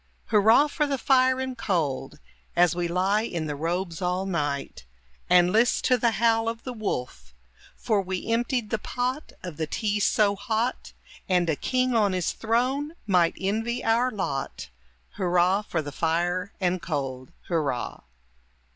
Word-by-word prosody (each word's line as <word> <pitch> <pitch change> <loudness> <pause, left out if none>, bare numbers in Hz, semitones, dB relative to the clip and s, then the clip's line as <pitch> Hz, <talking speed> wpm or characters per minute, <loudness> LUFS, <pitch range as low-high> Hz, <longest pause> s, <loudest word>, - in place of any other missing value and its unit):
Hurrah 220 +6 +5
for 295 0 -1
the 280 -1 -1
fire 260 0 +3
and 260 -1 -3
cold! 160 - -2 0.4
As 175 0 +4
we 175 -1 -1
lie 190 +5 +1
in 170 -8 -3
the 150 -1 -3
robes 170 +3 -3
all 180 +1 -1
night. 145 - -3 0.5
And 180 0 +5
list 230 +4 +2
to 255 - +4
the 235 - +3
howl 225 -1 +3
of 230 0 -6
the 255 - -5
wolf; 125 - -5 0.4
For 215 -3 0
we 185 -1 -4
emptied 235 0 -1
the 220 - 0
pot 255 +6 -3
of 175 -4 -7
the 160 -1 -2
tea 210 +4 -1
so 205 0 +3
hot, 220 +5 -2 0.4
And 180 -2 +2
a - - 0
king 255 - 0
on 210 -4 +3
his 180 -2 0
throne 255 +7 0
might 180 -5 +2
envy 225 +5 -1
our 235 +3 +2
lot, 185 - -4 0.5
Hurrah 180 +1 +2
for 170 -6 -3
the 145 - -6
fire 175 +5 -1
and 180 -2 0
cold! 135 -6 -4
Hurrah! 150 -8 -2
195 Hz, 155 wpm, -26 LUFS, 170-230 Hz, 0.5 s, Hurrah